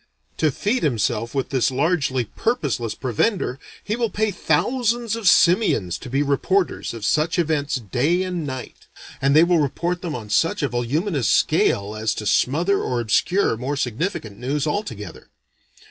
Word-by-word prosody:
To 155 - +2
feed 210 - -1
himself 115 -2 -1
with 135 - -1
this 130 -3 +1
largely 130 -3 0
purposeless 130 - -2
provender, 130 - -1 0.2
he 210 - -2
will 235 -1 0
pay 215 +2 0
thousands 230 - 0
of 230 -4 -2
simians 175 - +3
to 125 - -9
be 135 +3 +1
reporters 145 +1 0
of 110 -2 -5
such 155 +3 +1
events 150 -4 0
day 135 - 0
and 180 -3 -3
night; 130 -3 -7 0.3
and 135 +1 +3
they 155 - +7
will 175 -1 +3
report 170 +5 -1
them 170 -4 -4
on 110 -4 -7
such 165 - +1
a 140 - +1
voluminous 135 - -1
scale 100 +2 +2
as 110 0 -1
to 105 - -5
smother 165 - +2
or 125 -1 -1
obscure 120 - +1
more 135 +4 -3
significant 130 - -3
news 135 +3 -1
altogether. 115 - -5
145 Hz, 160 wpm, -22 LUFS, 125-180 Hz, 0.3 s, they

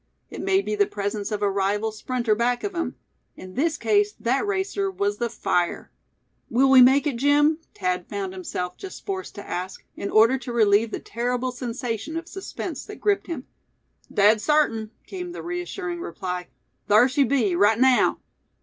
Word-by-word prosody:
It - - -6
may 390 0 +2
be - - -3
the 410 -1 +2
presence 205 +1 -3
of 210 -1 -2
a 200 - +2
rival 200 +3 0
sprinter 235 +1 -1
back 240 +3 0
of 405 - -3
him; 335 -1 -3 0.4
in 185 0 -10
this 310 - 0
case 210 -3 +2
that 265 - 0
racer 395 0 -1
was 205 - -1
the 240 -1 0
fire. 175 -4 -1 0.6
"Will 265 +3 +3
we 260 -1 +9
make 265 +4 +6
it, 280 -5 -1
Jim?" 295 +4 +3 0.2
Thad 180 -1 -1
found 195 -2 -4
himself 180 -1 -5
just 385 - -9
forced 380 -1 -4
to 205 - -9
ask, 185 +2 -5
in 200 - -4
order 230 +5 +5
to 245 0 -6
relieve 220 -1 +3
the - - -4
terrible 245 +2 -2
sensation 245 +3 -4
of 330 0 -6
suspense 385 +1 -6
that - - -10
gripped 405 -1 +1
him. 310 -7 -5 0.7
"Dead 210 +2 +4
sartin!" 230 -8 +2 0.2
came 360 -2 -6
the - - -7
reassuring 350 0 -4
reply; 180 - -5 0.4
"thar 215 +4 +6
she 275 +2 +2
be, 245 -10 +1
right 205 +4 +4
naow!" 260 -1 +4
245 Hz, 175 wpm, -24 LUFS, 205-310 Hz, 0.7 s, we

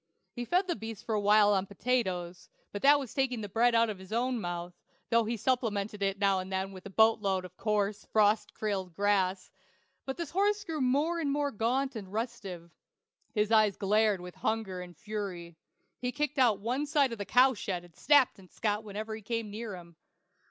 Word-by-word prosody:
He 240 -1 -4
fed 360 +8 +2
the 350 -2 -1
beast 225 -3 -8
for 225 - -2
a 210 - +1
while 205 0 +5
on 195 0 0
potatoes; 185 -5 -2 0.2
but 205 - -5
that 290 +1 +7
was 265 -5 -7
taking 255 -4 0
the 205 - -4
bread 235 +4 +3
out 230 0 +5
of 210 -3 -5
his 190 +1 -13
own 240 +1 0
mouth, 175 0 -4 0.4
though 230 -1 +4
he 230 +2 -2
supplemented 210 -4 -1
it 195 -1 +1
with 200 - -19
now 195 -1 +3
and 185 +1 -6
then 190 +1 -2
a 200 - -8
boat 220 +3 +4
load 190 -3 -1
of 180 0 -12
coarse, 210 0 -1
frost 215 0 +2
killed 190 -5 -2
grass, 195 -2 +1 0.6
but 265 - -3
the 340 - -2
horse 405 +6 +1
grew 325 -6 -4
more 290 +7 +1
and 290 -4 0
more 285 0 0
gaunt 255 +4 0
and 195 -4 -7
restive. 200 -7 -5 0.6
His 210 0 +1
eyes 215 -3 +4
glared 210 -1 +2
with 180 0 -9
hunger 215 -5 -2
and 175 -1 -11
fury. 195 -6 -5 0.4
He 250 0 -2
kicked 295 +1 -2
out 235 -6 +5
one 250 +8 -2
side 285 -4 +2
of 230 - -6
the - - -1
cowshed 250 +1 +3
and 175 -2 -18
snapped 285 -6 +4
at 185 -2 -16
Scott 210 -1 -1
whenever 215 +1 -5
he 220 - -9
came 225 0 -3
near 215 -1 -5
him. 170 -2 -13
215 Hz, 205 wpm, -30 LUFS, 195-250 Hz, 0.6 s, that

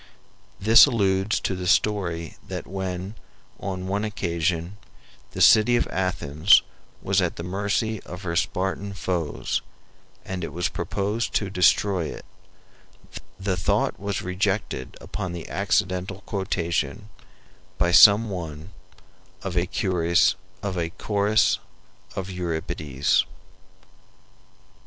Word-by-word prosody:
This 110 +7 +8
alludes 100 -4 +1
to - - -1
the 90 0 -4
story 85 -4 +1
that - - -5
when, 95 +1 -4 0.5
on 95 -1 -4
one 100 +2 -1
occasion, 85 -2 -2 0.6
the - - -4
city 110 +3 +6
of - - +1
Athens 90 -2 +3 0.4
was - - +2
at - - -1
the 85 - -6
mercy 100 +4 -1
of 90 +3 -9
her 85 -2 -3
Spartan 95 +3 -1
foes, 90 -5 -2 0.6
and 95 -1 -4
it - - -4
was 90 +1 -1
proposed 100 +6 -2
to 100 -3 0
destroy 90 0 +3
it, - - -8 1.1
the 95 -1 -1
thought 85 - 0
was 100 0 -3
rejected 90 -6 -2
upon 95 -4 -5
the 85 -2 -7
accidental 95 +1 -1
quotation, 90 -3 -2 0.7
by 85 - +2
some 105 +4 +8
one, 80 -1 -6 0.7
of 95 -2 -4
a 90 0 +1
chorus 85 -3 +2 0.3
of 95 - -1
Euripides. 80 -5 -1
95 Hz, 110 wpm, -24 LUFS, 85-100 Hz, 1.1 s, This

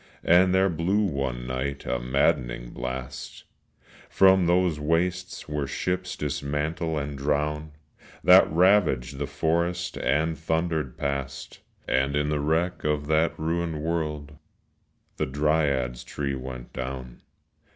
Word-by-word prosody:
And 90 +2 +5
there 95 +1 +4
blew 95 +5 +1
one 70 -7 -2
night 65 +3 -3
a 60 - -1
maddening - - 0
blast 65 0 -6 0.7
From 95 -2 +5
those 90 -3 +2
wastes 90 +4 -1
where 75 -2 -2
ships 90 +5 -2
dismantle 75 +3 -2
and 70 0 -3
drown, 75 +2 -1 0.5
That - - +7
ravaged 80 -8 +3
the 70 - -2
forest 85 +4 -1
and 80 +3 +1
thundered 80 -2 -1
past; 70 -1 -4 0.3
And 65 +2 +1
in 75 0 +1
the 75 -1 0
wreck 80 +5 0
of 75 -1 0
that 80 +1 +2
ruined 80 -1 -2
world 75 -3 -3 0.8
The - - -1
dryad's 70 -3 0
tree 70 -2 -3
went 65 -2 -7
down. 65 -1 -6
75 Hz, 120 wpm, -26 LUFS, 70-85 Hz, 0.8 s, That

